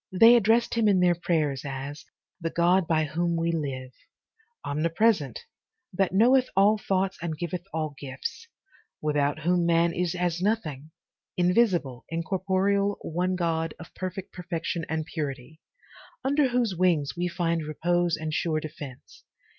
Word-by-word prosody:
'They 225 +6 +7
addressed 230 +1 +3
him 230 -2 +2
in 195 -3 +4
their 180 -1 +4
prayers 155 -5 0
as 140 +1 -6 0.3
'the 165 -2 -2
God 175 +1 +2
by 160 -2 +2
whom 170 +3 -1
we 165 0 0
live,* 135 -5 -3 0.7
'omnipresent, 165 - +1 0.5
that 195 0 +1
knoweth 250 +6 +4
all 205 +3 +4
thoughts, 195 -1 -1
and 165 -2 -3
giveth 175 +1 -3
all 155 -2 -2
gifts,' 460 - -6 0.5
'without 145 0 0
whom 175 +1 +2
man 170 0 +3
is 180 0 -1
as 175 -1 -1
nothing, 160 -9 -1 0.5
"invisible, 180 - +2
incorporeal, 190 +4 0
one 180 +3 -1
God, 165 -2 -1
of 165 - -12
perfect 185 0 -6
perfection 170 -2 -4
and 160 0 -1
purity,* 150 -2 -5 0.6
'under 280 +1 +3
whose 240 -5 0
wings 165 -5 +1
we 175 +1 -1
find 170 -1 -1
repose 175 +3 0
and 155 0 -4
sure 155 0 0
defence.' 145 -4 -10
170 Hz, 140 wpm, -27 LUFS, 155-190 Hz, 0.7 s, They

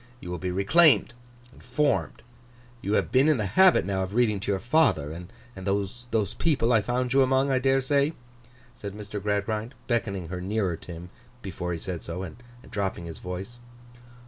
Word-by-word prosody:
You 90 - -7
will 90 - -4
be 90 - -3
reclaimed 130 - +4 0.4
and - - -17
formed. 145 +4 0 0.6
You 100 - -2
have - - +1
been 135 +4 +5
in 155 - +4
the 105 - -1
habit 185 - +5
now 95 -1 -1
of 95 +2 -4
reading 115 -4 +2
to 100 +1 -2
your 100 - +1
father, 120 - +2
and 95 +5 -10
those 100 +5 -2 0.3
people 130 -7 +2
I 110 - +5
found 125 +3 -1
you 135 - +5
among, 135 +1 +3
I 130 - +3
dare 135 +1 +2
say?' 140 +3 +2 0.6
said 100 -4 -7
Mr. 105 -1 -6
Gradgrind, 105 +4 -2
beckoning 100 -8 -1
her 90 0 -4
nearer 95 -2 -1
to 85 - -11
him 85 +1 -8 0.3
before 90 -2 -4
he 85 - -2
said 90 0 -5
so, 90 +3 -5
and 95 +3 -8 0.3
dropping 95 -4 -2
his 80 -1 -8
voice. 95 +7 -6
105 Hz, 185 wpm, -26 LUFS, 95-125 Hz, 0.6 s, been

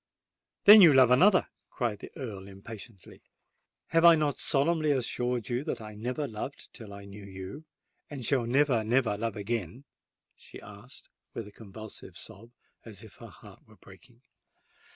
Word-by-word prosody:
"Then 210 +1 +10
you 165 -6 +8
love 130 -2 +6
another!" 185 +9 +4 0.2
cried 120 -6 -3
the - - -10
Earl, 100 -7 -7
impatiently. 100 +1 -12 0.7
"Have 165 0 +2
I 170 -1 +9
not 150 -3 -1
solemnly 155 +2 +1
assured 125 -3 -1
you 125 +2 -2
that - - -3
I 110 -1 -9
never 125 +7 -4
loved 115 +5 -8
till 110 -3 -11
I 100 0 -10
knew 100 +1 -11
you—and 115 +7 -11
shall 125 -3 +1
never, 130 -2 +2
never 115 -1 +1
love 115 0 -3
again!" 105 - -4 0.5
she - - -13
added, 105 +6 -12 0.3
with 115 - -5
a - - -13
convulsive 110 0 -11
sob, 115 +5 -9 0.3
as - - -10
if - - -15
her - - -11
heart - - -17
were - - -19
breaking. 120 +1 -19
120 Hz, 155 wpm, -28 LUFS, 105-140 Hz, 0.7 s, Then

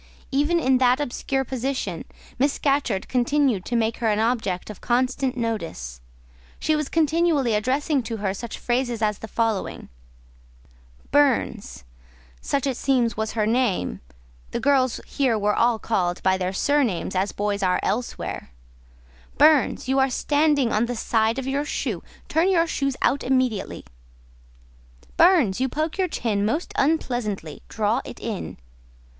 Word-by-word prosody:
Even 295 +5 +2
in 260 -4 +3
that 255 +1 +4
obscure 270 0 -2
position, 255 -9 -3 0.3
Miss 280 +2 +3
Scatcherd 275 -9 0
continued 250 -4 +1
to 240 - -2
make 225 -1 +1
her 235 - -1
an 210 -1 +2
object 220 -5 -1
of 210 - -13
constant 255 +1 0
notice: 165 - -4 0.6
she 310 - +1
was 300 -2 -2
continually 315 -5 +2
addressing 265 +6 +1
to 225 -1 -5
her 200 -2 -1
such 235 +3 -6
phrases 240 -2 -1
as 210 -2 0
the 225 - -7
following:— 225 -2 -2 1.2
"Burns" 260 - +1 0.6
(such 280 -1 -1
it 265 -3 -1
seems 245 -5 +1
was 220 0 -3
her 215 -1 +1
name: 215 - 0 0.5
the - - -3
girls 265 -3 +2
here 255 -5 0
were 210 0 +1
all 235 -1 +3
called 180 -6 -1
by 190 0 +3
their 185 0 -2
surnames, 235 -4 0
as 190 +2 0
boys 205 0 -2
are 180 -1 +2
elsewhere), 235 - -3 0.9
"Burns, 300 -3 +4
you 265 +1 +2
are 265 0 +3
standing 290 -1 +2
on 225 +3 +2
the 245 - -3
side 225 0 +1
of 265 - -3
your 275 +2 -1
shoe; 295 - -3 0.3
turn 330 +4 +2
your 340 -3 +3
toes 275 -5 -1
out 280 - +2
immediately." 255 -6 -1 1.3
"Burns, 290 - +4
you 265 - +1
poke 310 +6 -3
your 375 - +2
chin 215 - -1
most 265 - -1
unpleasantly; 240 - -1
draw 215 +1 0
it - - -9
in." 220 -5 -5
245 Hz, 150 wpm, -24 LUFS, 215-275 Hz, 1.3 s, that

